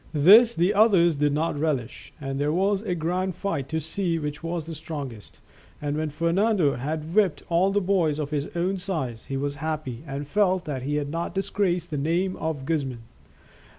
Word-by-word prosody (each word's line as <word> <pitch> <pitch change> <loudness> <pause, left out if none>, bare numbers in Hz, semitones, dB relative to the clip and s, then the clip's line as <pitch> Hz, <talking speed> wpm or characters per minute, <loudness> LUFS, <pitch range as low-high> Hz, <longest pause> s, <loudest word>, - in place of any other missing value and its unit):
This 220 +10 +7
the 175 +5 +2
others 195 -6 +5
did 145 0 +2
not 150 0 -1
relish, 145 -7 -2
and 135 -1 -4
there 145 +1 +1
was 195 +4 +1
a 185 -5 -2
grand 180 +2 -1
fight 180 -8 -3
to 160 - -1
see 165 +2 -1
which 150 -2 -4
was 165 -1 -3
the 165 - -6
strongest, 140 -8 -7 0.4
and 145 0 -2
when 155 0 -1
Fernando 170 +2 +2
had 155 +5 -4
whipped 200 -6 +2
all 175 +3 +3
the 205 +1 +1
boys 180 -6 +1
of 150 -1 -3
his 145 -1 -2
own 185 +3 0
size, 155 - -3
he 135 - -3
was 140 +1 -2
happy 150 -5 -3
and 140 +1 -5
felt 185 +1 +2
that 140 -4 -3
he 145 +3 -2
had 145 -1 -1
not 165 +3 -3
disgraced 180 -3 0
the 150 - -1
name 175 +6 0
of 160 -4 -3
Guzman. 135 -7 -2
160 Hz, 190 wpm, -25 LUFS, 145-185 Hz, 0.4 s, This